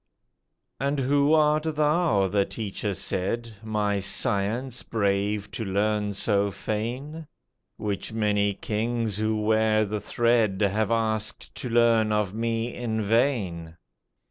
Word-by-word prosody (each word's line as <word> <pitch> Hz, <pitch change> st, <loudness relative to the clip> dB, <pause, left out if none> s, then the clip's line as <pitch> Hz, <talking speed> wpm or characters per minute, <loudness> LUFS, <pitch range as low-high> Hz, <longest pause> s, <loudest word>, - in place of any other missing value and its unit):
"And 140 Hz, +1 st, 0 dB
who 140 Hz, +3 st, +3 dB
art 155 Hz, 0 st, +3 dB
thou," 150 Hz, -, +2 dB
the 100 Hz, +1 st, +2 dB
teacher 105 Hz, -1 st, -4 dB
said, 115 Hz, +7 st, -2 dB
"My 105 Hz, -2 st, 0 dB
science 105 Hz, +6 st, 0 dB
brave 100 Hz, -1 st, -1 dB
to 110 Hz, -, -4 dB
learn 105 Hz, +1 st, 0 dB
so 100 Hz, 0 st, +2 dB
fain? 125 Hz, +11 st, -4 dB, 0.5 s
Which 100 Hz, 0 st, -3 dB
many 105 Hz, -2 st, +1 dB
kings 110 Hz, 0 st, -2 dB
who 110 Hz, 0 st, 0 dB
wear 110 Hz, 0 st, +2 dB
the 105 Hz, 0 st, -3 dB
thread 115 Hz, -3 st, +1 dB
Have 105 Hz, +1 st, +1 dB
asked 110 Hz, -2 st, -1 dB
to 125 Hz, -, -5 dB
learn 115 Hz, -2 st, +3 dB
of 105 Hz, -3 st, 0 dB
me 115 Hz, +1 st, -2 dB
in 115 Hz, -2 st, -3 dB
vain." 100 Hz, -8 st, 0 dB
110 Hz, 120 wpm, -26 LUFS, 100-120 Hz, 0.5 s, who